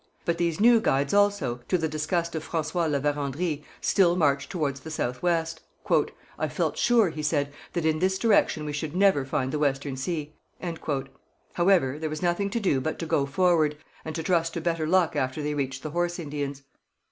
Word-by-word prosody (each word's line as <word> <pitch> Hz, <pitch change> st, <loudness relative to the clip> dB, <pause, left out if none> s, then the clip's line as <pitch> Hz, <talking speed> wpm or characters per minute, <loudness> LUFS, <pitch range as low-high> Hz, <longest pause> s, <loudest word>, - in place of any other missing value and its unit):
But 170 Hz, 0 st, 0 dB
these 170 Hz, 0 st, 0 dB
new 230 Hz, +1 st, +6 dB
guides 140 Hz, -6 st, +1 dB
also, 205 Hz, -12 st, +2 dB
to 180 Hz, -, +2 dB
the 160 Hz, -2 st, 0 dB
disgust 160 Hz, +3 st, -1 dB
of 160 Hz, -1 st, -3 dB
François 165 Hz, +1 st, 0 dB
La 145 Hz, -, +1 dB
Vérendrye, 145 Hz, +2 st, -1 dB, 0.2 s
still 175 Hz, -4 st, +3 dB
marched 140 Hz, -5 st, +1 dB
towards 145 Hz, -7 st, -2 dB
the 160 Hz, -, -9 dB
south 125 Hz, -5 st, -3 dB
west. 165 Hz, -2 st, 0 dB, 0.8 s
'I -, -, 0 dB
felt -, -, -1 dB
sure,' 235 Hz, -7 st, +3 dB
he 155 Hz, -, -5 dB
said, 145 Hz, -2 st, 0 dB, 0.2 s
'that 170 Hz, -2 st, -1 dB
in 155 Hz, -1 st, +2 dB
this 190 Hz, +2 st, +1 dB
direction 205 Hz, -8 st, +2 dB
we 150 Hz, -, -4 dB
should 150 Hz, +2 st, -4 dB
never 190 Hz, -8 st, +4 dB
find 135 Hz, -1 st, -1 dB
the 150 Hz, -, -2 dB
Western 140 Hz, -1 st, 0 dB
Sea.' 150 Hz, +2 st, -3 dB, 1.2 s
However, 170 Hz, -7 st, +3 dB
there 160 Hz, 0 st, -2 dB
was 155 Hz, +3 st, -5 dB
nothing 175 Hz, +3 st, +1 dB
to 235 Hz, -, -1 dB
do 165 Hz, -11 st, +1 dB
but 155 Hz, +4 st, -2 dB
to 165 Hz, -, -4 dB
go 140 Hz, -3 st, +1 dB
forward, 155 Hz, -1 st, +2 dB, 0.3 s
and 160 Hz, -, -6 dB
to 165 Hz, -, -3 dB
trust 165 Hz, -1 st, +1 dB
to 170 Hz, -, -2 dB
better 165 Hz, -1 st, -1 dB
luck 175 Hz, -2 st, +3 dB
after 135 Hz, +1 st, -1 dB
they 150 Hz, 0 st, -1 dB
reached 135 Hz, -2 st, -3 dB
the 155 Hz, -, -4 dB
Horse 175 Hz, +1 st, -1 dB
Indians. 145 Hz, -4 st, -4 dB
160 Hz, 195 wpm, -26 LUFS, 145-175 Hz, 1.2 s, new